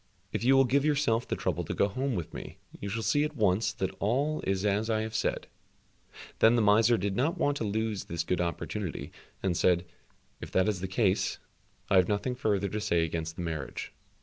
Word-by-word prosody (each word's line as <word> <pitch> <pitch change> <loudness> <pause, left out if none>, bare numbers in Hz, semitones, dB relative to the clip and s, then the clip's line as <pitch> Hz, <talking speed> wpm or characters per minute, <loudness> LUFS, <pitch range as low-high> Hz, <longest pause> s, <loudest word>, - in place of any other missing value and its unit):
"If - - -2
you 130 +2 +5
will 135 0 +6
give 140 +3 +2
yourself 145 -6 +1
the - - -1
trouble - - -1
to - - -4
go 100 - +3
home 130 +5 -2
with 85 -4 -4
me, - - -8 0.2
you 100 - -4
shall 110 +3 -3
see 145 +5 +2
at 150 0 -3
once 105 -2 +2
that 95 0 -2
all 140 +9 0
is 95 +1 0
as 105 +2 +1
I 110 -1 +1
have 110 0 -4
said." - - -1 0.9
Then 115 +2 +6
the 120 - +3
miser 110 +3 +5
did 100 0 -2
not 155 - +1
want 145 -4 +1
to - - -3
lose 110 -1 -2
this 85 -1 -3
good 90 +1 0
opportunity, 90 +2 -4 0.3
and 95 -2 +1
said, 90 +1 +3 0.6
"If - - -6
that 95 +2 +3
is 100 -4 -1
the 95 - -2
case, 95 0 +1 0.5
I 95 - +4
have 90 -1 +5
nothing 105 +5 -1
further 105 -6 0
to 105 +2 -3
say 85 -6 +2
against 80 0 -3
the 90 - -5
marriage." 80 -2 -4
105 Hz, 215 wpm, -29 LUFS, 95-120 Hz, 0.9 s, will